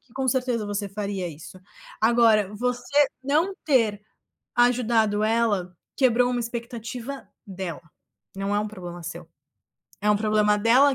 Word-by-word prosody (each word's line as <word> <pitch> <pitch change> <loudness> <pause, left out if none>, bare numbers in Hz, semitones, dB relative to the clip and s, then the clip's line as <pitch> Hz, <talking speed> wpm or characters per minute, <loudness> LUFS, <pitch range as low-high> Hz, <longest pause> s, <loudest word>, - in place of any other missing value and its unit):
que 245 - -28
com 265 0 -2
certeza 245 -4 0
você 205 0 -3
faria 200 -2 -3
isso. 160 +4 -11 0.4
Agora, 220 -3 +4
você 250 +5 +1 0.2
não 320 +8 +1
ter 225 -8 +2 0.5
ajudado 230 -4 +3
ela, 215 -5 +1 0.2
quebrou 250 -1 +3
uma 245 -1 -1
expectativa 235 +2 -6 0.2
dela. 185 -5 -6 0.5
Não 195 +1 -1
é - - +2
um 210 - -3
problema 175 -4 -8
seu, 170 +1 -7 0.7
é 210 - 0
um 210 - +4
problema 210 0 +2
dela 255 +6 +5
220 Hz, 135 wpm, -25 LUFS, 205-245 Hz, 0.7 s, dela